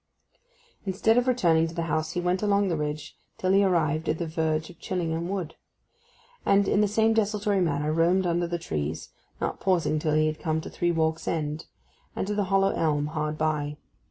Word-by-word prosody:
Instead 205 +3 +2
of 250 - -2
returning 170 -10 +3
to 165 - -9
the 170 - -1
house 160 0 -1
he 180 - -1
went 180 +1 0
along 200 -1 +2
the 170 - 0
ridge 150 0 -4 0.2
till 185 - 0
he 195 +1 +5
arrived 160 -4 +1
at 155 - +1
the 170 - -2
verge 160 0 -1
of 170 - -19
Chillington 170 -2 -2
Wood, 185 -4 -3 0.9
and 200 0 +3
in 205 - +3
the 210 - +3
same 220 +2 +2
desultory 210 -2 +1
manner 150 -2 0
roamed 175 +3 +3
under 175 0 +1
the 175 0 -2
trees, 75 - -4 0.3
not - - -2
pausing 175 -5 +1
till 155 0 0
he 155 0 +3
had 155 0 -2
come 160 -2 -1
to - - -8
Three 175 0 0
Walks 160 -1 0
End, 155 -1 -2 0.5
and - - -2
the 205 -1 0
hollow 195 +1 +3
elm 150 -2 0
hard 155 -1 -2
by. 150 -1 -1
170 Hz, 195 wpm, -26 LUFS, 155-190 Hz, 0.9 s, he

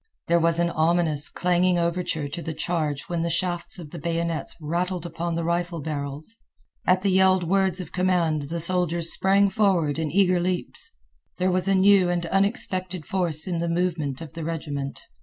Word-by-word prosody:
There 170 0 +3
was 165 0 +2
an 170 0 +1
ominous, 160 -2 +2
clanging 180 0 +1
overture 170 -3 -1
to 145 +4 -6
the 160 -1 -5
charge 155 -6 -2
when 170 -1 -3
the 170 - -1
shafts 175 0 -2
of 160 -5 -10
the 170 - -7
bayonets 165 0 -3
rattled 175 +3 -3
upon 170 0 -4
the 170 - -2
rifle 170 0 -2
barrels. 145 +6 -6 0.5
At 185 +1 +3
the 200 - +2
yelled 190 -1 +4
words 190 +1 +1
of 180 -4 -7
command 170 -6 0
the 170 +1 -3
soldiers 170 -1 +4
sprang 195 +1 +3
forward 175 -8 +1
in 160 -2 -2
eager 185 +1 +2
leaps. 180 0 -4 0.5
There 185 +1 +1
was 180 +1 +1
new 195 -1 +4
and 175 -1 -1
unexpected 185 -3 0
force 170 -5 +3
in 175 -3 -2
the 170 0 -2
movement 170 -5 -2
of 160 -4 -9
the 165 0 -6
regiment. 145 -4 -5
170 Hz, 175 wpm, -24 LUFS, 160-185 Hz, 0.5 s, yelled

